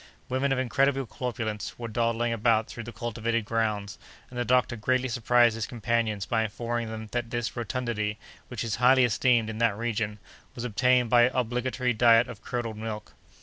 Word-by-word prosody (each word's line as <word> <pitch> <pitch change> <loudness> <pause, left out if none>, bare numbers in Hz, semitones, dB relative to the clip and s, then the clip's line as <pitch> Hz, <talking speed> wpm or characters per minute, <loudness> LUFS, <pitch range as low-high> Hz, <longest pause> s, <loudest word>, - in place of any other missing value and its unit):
Women 130 +2 0
of 135 - +2
incredible 135 +1 +1
corpulence 110 -3 -4
were 120 - -5
dawdling 115 +1 0
about 115 -1 +2
through 120 +1 -8
the 120 - -7
cultivated 115 0 -2
grounds, 105 -4 -2 0.3
and 125 - -5
the - - +1
doctor 125 0 +2
greatly 130 +4 0
surprised 120 0 +3
his 110 -1 -3
companions 115 -3 -1
by 115 -1 +1
informing 115 +2 -3
them 110 -1 -7
that 120 -1 -2
this 120 -1 -3
rotundity, 115 -2 -2 0.3
which 125 -2 -4
is 115 -2 -2
highly 125 +1 +5
esteemed 120 0 +2
in 110 0 -5
that 115 -4 +2
region, 110 -2 -2 0.4
was 120 - -5
obtained 125 +1 +2
by 120 -1 +7
an 125 - 0
obligatory 125 +1 0
diet 115 +1 +5
of 120 -4 -9
curdled 115 -3 -4
milk. 110 -1 -6
115 Hz, 180 wpm, -27 LUFS, 110-125 Hz, 0.4 s, by